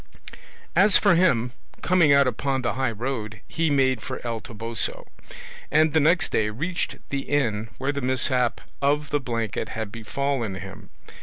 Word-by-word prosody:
As 205 0 +6
for - - +4
him, 125 -9 +3 0.3
coming 175 -5 +4
out 140 0 +6
upon 135 +1 -1
the 120 - 0
high 130 0 0
road, 110 -1 -4
he 165 -1 0
made 130 -4 +2
for 130 0 -5
El 115 -1 -2
Toboso, 115 -1 -4 0.6
and 155 0 +3
the 160 - +5
next 160 +4 +3
day 105 -1 +1
reached 160 +12 -3
the 140 - -1
inn 115 -7 0
where 135 +2 -1
the 140 -1 -4
mishap 130 -1 +1 0.2
of 145 +1 +1
the 145 - +2
blanket 115 -5 -3
had 110 -2 -5
befallen 115 -1 -2
him. 95 +1 -9
130 Hz, 160 wpm, -25 LUFS, 115-145 Hz, 0.6 s, As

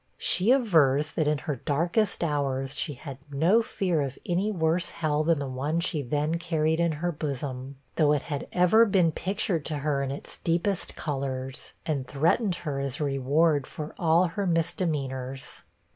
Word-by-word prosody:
She 185 +7 +4
avers 155 - +3
that, 155 - 0
in 150 0 +2
her 140 0 -4
darkest 170 - 0
hours, 135 -3 -1
she 150 - -2
had 135 +1 -9
no 165 +11 +3
fear 180 -7 -1
of 135 -2 -3
any 185 +4 0
worse 170 -3 0
hell 155 -2 0
than 165 0 +3
the 140 -1 -3
one 140 +5 -1
she 170 -3 -1
then 150 +5 -1
carried 160 -2 0
in 170 -1 +2
her 175 +4 -2
bosom; 140 -3 -4 0.2
though 150 -3 +4
it 145 - 0
had 145 -3 -4
ever 200 +6 +5
been 185 -5 +3
pictured 185 -3 -1
to 155 - -2
her 145 -2 +1
in 135 - -2
its 140 - -7
deepest 175 +3 -1
colors, 135 -3 -4
and 140 -5 -2
threatened 170 - +1
her 140 -3 -2
as 140 -1 -3
a - - 0
reward 145 +2 +2
for 155 0 -7
all 165 +1 +4
her 195 +3 -2
misdemeanors. 140 -6 -2
155 Hz, 175 wpm, -27 LUFS, 140-170 Hz, 0.2 s, ever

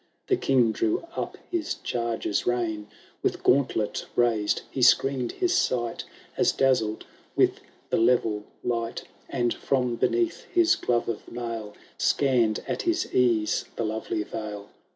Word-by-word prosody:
The 385 - +3
King 130 - +3
drew 110 - 0
up - - -4
his 340 -3 -1
chaiger^s 115 -3 -1
rein; 110 -4 -1 0.3
With - - -1
gauntlet 125 -5 +1
raised 115 -4 +2
he 135 - -3
screened 130 0 +4
his 360 -1 +1
sight, 120 - 0 0.3
As - - +3
dazzled 120 -5 +1 0.3
with - - +3 0.3
the - - +3
level 115 -3 +2 0.2
light, 115 -1 -2 0.3
And, 120 -3 0
from 125 -3 0
beneath 360 - 0
his 350 -6 +3
glove 120 -1 0
of 115 -2 -5
mail, 115 -3 -5 0.2
SoannM 120 -6 +2
at - - -2
his 340 0 -1
ease 115 -4 +2
the - - -2
lovely 110 0 -2
vale. 105 -1 -6
120 Hz, 135 wpm, -26 LUFS, 110-135 Hz, 0.3 s, screened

